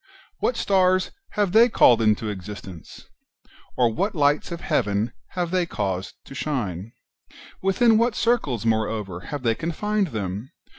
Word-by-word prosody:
what 250 Hz, -, 0 dB
stars 185 Hz, -1 st, +2 dB, 0.3 s
have 205 Hz, -3 st, +2 dB
they 230 Hz, +4 st, +6 dB
called 120 Hz, -, +5 dB
into 110 Hz, 0 st, +2 dB
existence? 95 Hz, -3 st, -8 dB, 0.7 s
or 120 Hz, -3 st, +3 dB
what 200 Hz, -, -1 dB
lights 145 Hz, +2 st, +2 dB
of 170 Hz, -, -4 dB
heaven 105 Hz, +3 st, 0 dB, 0.2 s
have 175 Hz, -2 st, -2 dB
they 185 Hz, -1 st, +2 dB
caused 95 Hz, -, -3 dB
to -, -, -11 dB
shine? 115 Hz, -, -3 dB, 0.7 s
within 220 Hz, +4 st, +4 dB
what 230 Hz, -1 st, +2 dB
circles, 150 Hz, -, 0 dB
moreover, 110 Hz, -4 st, -1 dB
have 140 Hz, +9 st, -6 dB
they 115 Hz, -2 st, +3 dB
confined 200 Hz, -, -1 dB
them 105 Hz, -, -4 dB
130 Hz, 140 wpm, -24 LUFS, -, 0.7 s, they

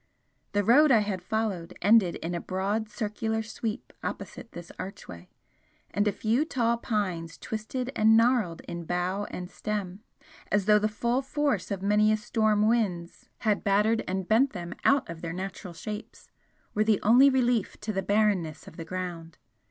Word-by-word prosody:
The 205 Hz, 0 st, +2 dB
road 285 Hz, +9 st, +6 dB
I 225 Hz, -4 st, +6 dB
had 200 Hz, -3 st, -3 dB
followed 190 Hz, -4 st, -3 dB
ended 205 Hz, -2 st, +4 dB
in 170 Hz, +2 st, -4 dB
a 170 Hz, -, -2 dB
broad 205 Hz, +4 st, -2 dB
circular 220 Hz, +1 st, -2 dB
sweep 220 Hz, 0 st, -5 dB
opposite 230 Hz, -, -6 dB
this 170 Hz, -1 st, -9 dB
archway, 90 Hz, -, -8 dB, 0.6 s
and 205 Hz, +3 st, +1 dB
a -, -, +3 dB
few 225 Hz, +7 st, +1 dB
tall 235 Hz, -6 st, 0 dB
pines 185 Hz, -8 st, -2 dB
twisted 245 Hz, +4 st, -4 dB
and 220 Hz, +1 st, +5 dB
gnarled 230 Hz, -8 st, +2 dB
in 170 Hz, -1 st, -7 dB
bough 180 Hz, +4 st, -1 dB
and 180 Hz, -, -6 dB
stem, 200 Hz, -3 st, -4 dB, 0.5 s
as 205 Hz, -2 st, +2 dB
though 210 Hz, 0 st, +6 dB
the 215 Hz, -, +1 dB
full 235 Hz, +4 st, 0 dB
force 285 Hz, +1 st, -1 dB
of 195 Hz, -2 st, -3 dB
many 210 Hz, +1 st, +4 dB
storm 215 Hz, 0 st, +1 dB
winds 190 Hz, -7 st, -1 dB
had 210 Hz, -3 st, +1 dB
battered 210 Hz, +3 st, +2 dB
and 190 Hz, 0 st, -2 dB
bent 240 Hz, +4 st, +3 dB
them 175 Hz, -3 st, -6 dB
out 275 Hz, 0 st, +3 dB
of 165 Hz, -1 st, -8 dB
their 165 Hz, -1 st, -4 dB
natural 185 Hz, -1 st, -6 dB
shapes, 210 Hz, +6 st, -8 dB, 0.4 s
were 210 Hz, -, +2 dB
the 215 Hz, -1 st, +2 dB
only 245 Hz, +6 st, +7 dB
relief 245 Hz, -5 st, +1 dB
to 215 Hz, +1 st, -3 dB
the 195 Hz, -, 0 dB
barrenness 200 Hz, -6 st, 0 dB
of -, -, -12 dB
the 165 Hz, -, -6 dB
ground. 170 Hz, -2 st, -6 dB
210 Hz, 165 wpm, -28 LUFS, 185-225 Hz, 0.6 s, only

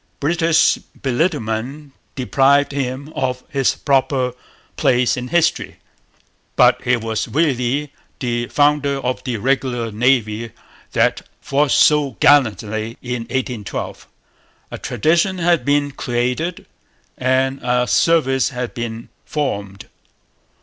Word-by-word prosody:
British 165 Hz, +2 st, +2 dB, 0.2 s
belittlement 135 Hz, -1 st, -2 dB, 0.2 s
deprived 140 Hz, +2 st, +3 dB
him 140 Hz, +2 st, -4 dB
of 125 Hz, -1 st, -2 dB
his 135 Hz, -5 st, +1 dB
proper 135 Hz, -2 st, +1 dB, 0.4 s
place 125 Hz, -2 st, +2 dB
in 125 Hz, 0 st, -5 dB
history; 170 Hz, +3 st, +1 dB, 0.8 s
but -, -, +4 dB
he 125 Hz, 0 st, +2 dB
was 110 Hz, -2 st, -3 dB
really 140 Hz, -1 st, 0 dB, 0.2 s
the 120 Hz, -2 st, -2 dB
founder 145 Hz, -1 st, +2 dB
of 125 Hz, 0 st, -3 dB
the 125 Hz, -4 st, -2 dB
regular 120 Hz, -1 st, -1 dB
Navy 115 Hz, -1 st, 0 dB, 0.4 s
that -, -, +2 dB, 0.2 s
fought 140 Hz, +1 st, 0 dB
so 145 Hz, -5 st, +3 dB
gallantly 110 Hz, -5 st, +2 dB
in 120 Hz, -2 st, -4 dB
'1812.' 125 Hz, -5 st, -4 dB, 0.6 s
A -, -, -6 dB
tradition 165 Hz, -, +1 dB
had 170 Hz, -5 st, +2 dB
been 145 Hz, +1 st, +1 dB
created 125 Hz, +7 st, -2 dB, 0.5 s
and 130 Hz, +1 st, 0 dB
a 125 Hz, 0 st, +1 dB
service 135 Hz, -3 st, +2 dB
had 125 Hz, -2 st, -5 dB
been 115 Hz, -2 st, -6 dB
formed. 100 Hz, -10 st, -4 dB
130 Hz, 110 wpm, -19 LUFS, 120-145 Hz, 0.8 s, but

